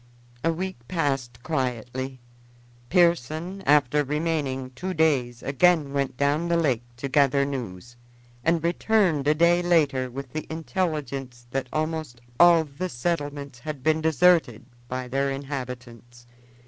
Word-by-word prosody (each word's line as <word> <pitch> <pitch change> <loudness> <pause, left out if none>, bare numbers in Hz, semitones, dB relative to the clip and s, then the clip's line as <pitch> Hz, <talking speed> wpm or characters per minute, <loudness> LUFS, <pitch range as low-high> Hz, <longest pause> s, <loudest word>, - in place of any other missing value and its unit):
A 165 - +3
week 185 -1 -4
passed 135 -8 -2
quietly. 130 -2 -3 0.7
Pearson, 170 +1 +1
after 145 0 +4
remaining 145 -3 -2
two 185 +8 -5
days, 130 -7 +1
again 150 0 +3
went 140 -3 -1
down 145 +5 +1
the 170 0 +2
lake 135 -8 +1 0.2
to 140 - -4
gather 140 0 +3
news, 120 -4 -6 0.5
and 165 +1 +2
returned 170 -4 +2
a 150 - +4
day 170 +2 +4
later 150 -7 +2
with 135 +1 -8
the 155 - -4
intelligence 150 -7 -3
that 135 -1 -2
almost 155 -5 -3 0.2
all 170 -2 +7
the 160 +5 -5
settlements 145 -2 -3
had 150 0 -6
been 155 +1 +2
deserted 160 -7 +3 0.2
by 130 0 -4
their 135 +2 0
inhabitants. 125 -3 -7
145 Hz, 130 wpm, -25 LUFS, 130-165 Hz, 0.7 s, all